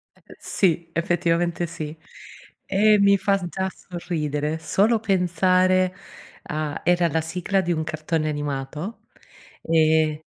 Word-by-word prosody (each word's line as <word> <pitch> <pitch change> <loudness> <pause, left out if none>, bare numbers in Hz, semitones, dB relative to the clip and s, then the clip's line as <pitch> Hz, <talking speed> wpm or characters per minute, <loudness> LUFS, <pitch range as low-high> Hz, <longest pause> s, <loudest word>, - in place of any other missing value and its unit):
E - - -17
sì. 170 -3 0
Effettivamente, 170 0 0
sì. 155 -1 -6 0.7
E, 210 +2 +4
mi 200 0 +5
fa 200 +1 +2
già 190 +2 -2
sorridere 155 -4 -3
solo 210 +8 +2
pensare 185 -1 +2 0.5
a 150 -1 -4
era 175 -1 +3
la 160 0 0
sigla 180 +4 -1
di 175 -1 -2
un 160 -1 0
cartone 155 0 -2
animato, 145 +6 -4 0.6
e 155 -1 +2
170 Hz, 115 wpm, -23 LUFS, 155-185 Hz, 0.7 s, mi